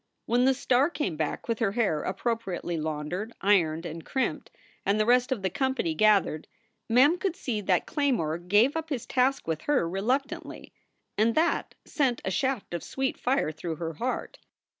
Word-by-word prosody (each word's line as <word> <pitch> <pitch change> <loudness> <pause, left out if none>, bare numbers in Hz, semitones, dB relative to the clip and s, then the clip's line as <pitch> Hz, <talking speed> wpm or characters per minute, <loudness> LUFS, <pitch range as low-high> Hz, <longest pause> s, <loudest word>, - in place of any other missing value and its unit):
When 245 +2 +2
the 265 0 +4
star 260 +2 +2
came 285 - -2
back 155 -1 -3
with 230 0 -1
her 210 -4 +1
hair 205 -10 +1
appropriately 195 -3 -2
laundered, 160 +7 -3
ironed, 170 -5 +2
and 165 -1 -6
crimped, 265 - -2 0.3
and 200 +2 +1
the 215 - +3
rest 250 +2 +3
of 230 -7 -1
the 190 - +1
company 265 - 0
gathered, 195 -4 +3 0.4
Mem 280 +9 +5
could 375 -3 -1
see 230 -10 -3
that 185 -3 +1
Claymore 235 - 0
gave 205 - +3
up 320 -1 -3
his 265 -6 -3
task 265 -3 +1
with 160 -1 -2
her 270 - +3
reluctantly. 240 +10 -3 0.5
And 225 +2 +3
that 330 +2 +1
sent 265 -5 0
a 190 - -1
shaft 260 -3 -1
of 170 - -3
sweet 265 -1 -2
fire 255 - +1
through 160 +1 -5
her 165 +1 -4
heart. 245 +11 -4
225 Hz, 175 wpm, -27 LUFS, 175-265 Hz, 0.5 s, Mem